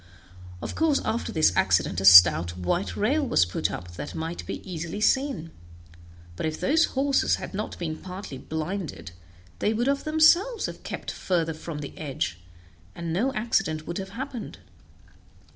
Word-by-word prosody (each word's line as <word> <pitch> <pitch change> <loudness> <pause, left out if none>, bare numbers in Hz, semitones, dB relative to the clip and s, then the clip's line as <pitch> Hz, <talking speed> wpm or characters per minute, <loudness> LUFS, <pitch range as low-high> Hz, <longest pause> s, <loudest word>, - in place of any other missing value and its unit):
Of - - -4
course 315 -3 +2
after 225 +2 -2
this 155 - +3
accident 85 - +2
a - - -2
stout 90 -2 +8
white 175 - -2
rail 275 +9 +1
was 245 - +3
put 85 - -2
up 85 0 -8
that 145 - -6
might 165 +2 -4
be - - -6
easily 170 +2 -5
seen, 265 - +1 0.8
but 125 - -2
if 155 - -4
those 315 +4 +3
horses 275 0 +2
had - - -8
not 210 +2 -4
been 160 -3 -3
partly 185 -7 -8
blinded, 160 - -5 0.5
they 215 - +1
would 240 +3 0
of 280 0 +1
themselves 330 +9 +4
have - - -7
kept - - -5
further 165 -3 -1
from 155 -1 -7
the 140 - -8
edge, 130 - -3 0.6
and 165 -1 -4
no 235 +10 +1
accident 195 -9 0
would 170 - -4
have 190 0 -6
happened. 260 -3 -6
175 Hz, 160 wpm, -26 LUFS, 155-255 Hz, 0.8 s, stout